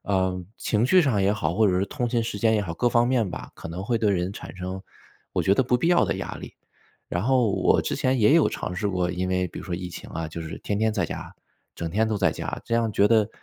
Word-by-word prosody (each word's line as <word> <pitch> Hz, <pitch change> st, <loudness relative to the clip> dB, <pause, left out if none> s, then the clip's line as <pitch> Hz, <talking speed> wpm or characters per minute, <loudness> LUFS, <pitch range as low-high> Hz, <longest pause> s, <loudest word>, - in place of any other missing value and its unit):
呃， 95 Hz, -2 st, 0 dB, 0.2 s
情 110 Hz, +1 st, +1 dB
绪 185 Hz, +6 st, +6 dB
上 120 Hz, -10 st, +1 dB
也 95 Hz, -, +3 dB
好， 85 Hz, -6 st, -1 dB
或 110 Hz, +3 st, +4 dB
者 90 Hz, -2 st, +2 dB
是 95 Hz, -, +1 dB
通 125 Hz, -4 st, -2 dB
勤 115 Hz, 0 st, +1 dB
时 115 Hz, -2 st, -4 dB
间 110 Hz, +2 st, +3 dB
也 105 Hz, -, +2 dB
好， 85 Hz, -, -4 dB
各 120 Hz, -, +2 dB
方 120 Hz, 0 st, +3 dB
面 120 Hz, -7 st, +1 dB
吧， -, -, -7 dB
可 -, -, -9 dB
能 85 Hz, +3 st, -5 dB
会 115 Hz, +2 st, +1 dB
对 110 Hz, -2 st, +2 dB
人 90 Hz, -1 st, 0 dB
产 -, -, -9 dB
生 95 Hz, +1 st, -5 dB, 0.5 s
我 -, -, 0 dB
觉 95 Hz, -, +4 dB
得 130 Hz, -, +3 dB
不 125 Hz, 0 st, +2 dB
必 165 Hz, -, +1 dB
要 175 Hz, 0 st, +5 dB
的 -, -, -1 dB
压 -, -, -5 dB
力。 -, -, -10 dB, 0.5 s
然 90 Hz, -, -2 dB
后 125 Hz, -2 st, +3 dB
我 -, -, +3 dB
之 -, -, -2 dB
前 130 Hz, 0 st, +1 dB
也 110 Hz, +7 st, +5 dB
有 165 Hz, -, +5 dB
尝 90 Hz, -, -4 dB
试 105 Hz, +3 st, -2 dB
过， 90 Hz, -2 st, 0 dB
因 90 Hz, +1 st, -2 dB
为 90 Hz, 0 st, +1 dB
比 -, -, -9 dB
如 -, -, -7 dB
说 90 Hz, -, -3 dB
疫 90 Hz, 0 st, -5 dB
情 -, -, -9 dB
啊， 80 Hz, -1 st, -4 dB
就 80 Hz, +1 st, -7 dB
是 80 Hz, -, -7 dB
天 100 Hz, -, -2 dB
天 110 Hz, 0 st, +2 dB
在 105 Hz, -, 0 dB
家， -, -, -7 dB, 0.4 s
整 85 Hz, -1 st, -4 dB
天 110 Hz, +6 st, +1 dB
都 110 Hz, -, 0 dB
在 95 Hz, -, +3 dB
家， -, -, -5 dB
这 115 Hz, -, -1 dB
样 115 Hz, -1 st, +2 dB
觉 100 Hz, 0 st, +3 dB
得 110 Hz, -1 st, +3 dB
100 Hz, 305 characters per minute, -25 LUFS, 90-115 Hz, 0.5 s, 绪